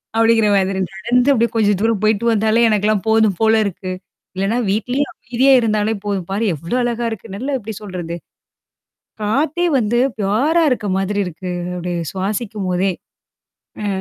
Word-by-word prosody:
அப்பிடிங்கிற 225 -1 +4
மாதிரி. 190 0 0 0.2
நடந்து 245 +6 +1
அப்பிடியே 235 -1 +1
கொஞ்ச 210 -2 +3
தூரம் 225 -3 +1
போயிட்டு 215 +1 +1
வந்தாலே 220 +2 +3
எனக்கெல்லாம் 210 0 +1
போதும் 220 -5 +3
போல 220 0 +4
இருக்கு. 185 -1 -4 0.4
இல்லனா 195 +5 0
வீட்லயே 245 +7 0
அமைதியா 255 +3 +2
இருந்தாலே 215 0 0
போதும் 195 -4 -2
பாரு! 210 +4 -1
எவ்ளோ 170 - -3
அழகா 235 -1 -1
இருக்கு? 210 -3 -8
நல்லா 265 +6 -3
எப்பிடி 220 0 -7
சொல்றது? 175 -4 -5 1.1
காத்தே 290 +11 +1
வந்து 235 +1 +1 0.2
ஃப்யுரா 245 +12 +2
இருக்க 215 -5 -1
மாதிரி 200 +1 -1
இருக்கு. 180 +2 -6 0.2
அப்பிடி 175 0 -3 0.2
சுவாசிக்கும்போதே! 195 -2 -1 0.9
அ, - - -2
215 Hz, 140 wpm, -18 LUFS, 195-235 Hz, 1.1 s, அப்பிடிங்கிற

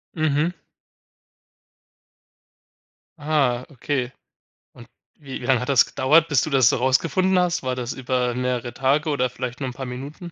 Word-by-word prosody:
Mhm. 155 +2 +1 2.7
Ah, 140 -5 0
okay. 130 -2 -3 0.6
Und - - -14 0.3
wie 135 -3 -8
wie 120 - -6
lang 130 -3 +3
hat 125 - -5
das 135 -4 +5
gedauert, 150 +5 +3
bis 145 -6 +2
du - - -2
das 130 -4 +4
so - - +1
rausgefunden 165 +9 +2
hast? 180 -1 +1
War 130 -1 -2
das 125 0 -4
über 125 -1 -1
mehrere 125 -1 -2
Tage 140 +5 +1
oder 130 -3 0
vielleicht 125 +1 -6
nur 135 - -3
'n 125 - -8
paar 135 +1 -6
Minuten? 140 +7 -8
130 Hz, 155 wpm, -23 LUFS, 125-150 Hz, 2.7 s, das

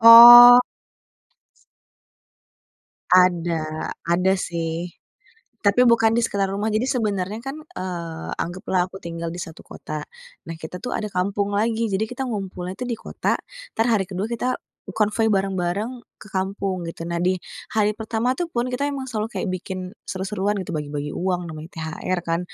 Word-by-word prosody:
Oh. 240 +2 +12 2.5
Ada, 170 -3 +2 0.2
ada 180 +2 +2
sih, 165 0 -3 0.8
tapi 205 +5 +4
bukan 225 -1 +4
di 235 - +2
sekitar 200 -3 0
rumah. 210 +2 -1
Jadi 215 +4 0
sebenarnya, 210 -5 -1
eee, - - -21
kan 280 - -6 0.8
anggaplah 180 +1 -1
aku 190 - -11
tinggal 170 0 -5
di 175 - -6
satu 160 - -9
kota. 155 -1 -7 0.4
Nah, 165 - -6
kita 160 +3 -6
tuh 250 +6 -5
ada 210 - -3
kampung 200 +2 -1
lagi. 225 +1 0
Jadi 200 +2 0
kita 250 +2 -5
ngumpulnya 190 -3 -5
tuh 250 - -4
di 235 - 0
kota, - - -1 0.4
entar 225 +2 +1
hari 210 -5 +2
ke-2 195 +4 -4
kita 245 +2 -1 0.4
konvoi 215 +1 +1
bareng-bareng 195 +5 -1 0.2
ke 215 - -13
kampung 190 -2 -2
gitu. 165 0 -6
Nah, 170 - -3
di 185 0 +1 0.3
hari 210 -1 +1
pertama 225 +3 -1
tuh 335 +2 -3
pun, 240 +1 -1
kita 255 +2 -2
emang 270 -2 -5
selalu 220 -3 -2
kayak - - -3
bikin 185 +1 -4 0.2
seru-seruan 195 +1 -2
gitu, 180 -2 -5
bagi-bagi 145 -1 -4
uang 180 -1 -1
namanya 155 0 -8
THR, 165 +3 -3
kan 165 -1 -1
195 Hz, 155 wpm, -23 LUFS, 175-225 Hz, 2.5 s, Oh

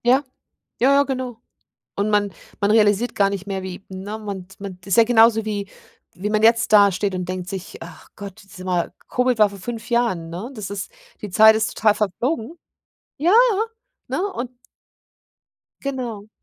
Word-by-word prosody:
Ja, 260 +4 +4 0.6
ja, 265 +3 +4
ja, 280 0 +5
genau. 255 -4 -4 0.5
Und 200 +2 0
man 205 -1 +1 0.3
man 200 +1 +2
realisiert 215 +2 +3
gar 200 -1 +3
nicht 200 -1 -5
mehr, 195 -1 -3
wie 190 +1 -8
ne, 195 +3 -6
man 200 -4 -6
d 190 - -16
man 195 -2 -7
d 190 - -12
ist 190 - +2
ja 230 - +8
genauso 225 -1 +5
wie 205 -2 -3 0.4
wie 200 +3 -4
man 215 0 +1
jetzt 230 0 +4
da 200 -1 +7
steht 195 +1 -2
und 180 -1 -3
denkt 185 -1 -4
sich: 190 -2 -7 0.2
„Ach - - -18
Gott, 200 -2 -10
dieses 185 -2 -12
Mal“ 180 -2 -1
Covid 250 -2 +1
war 210 -1 +6
vor 200 0 -11
5 230 +4 -6
Jahren, 230 -9 0
ne? 185 +10 -6
Das 215 -6 -6
ist 200 - -5 0.3
die 210 - -5
Zeit 220 +4 +7
ist 220 0 -1
total 215 -1 +4
verflogen. 230 - -2 0.6
Ja, 335 +5 +3 0.8
ne? - - -1
Und 245 -7 -4 1.3
Genau. 245 -7 -5
210 Hz, 185 wpm, -22 LUFS, 195-235 Hz, 1.3 s, ja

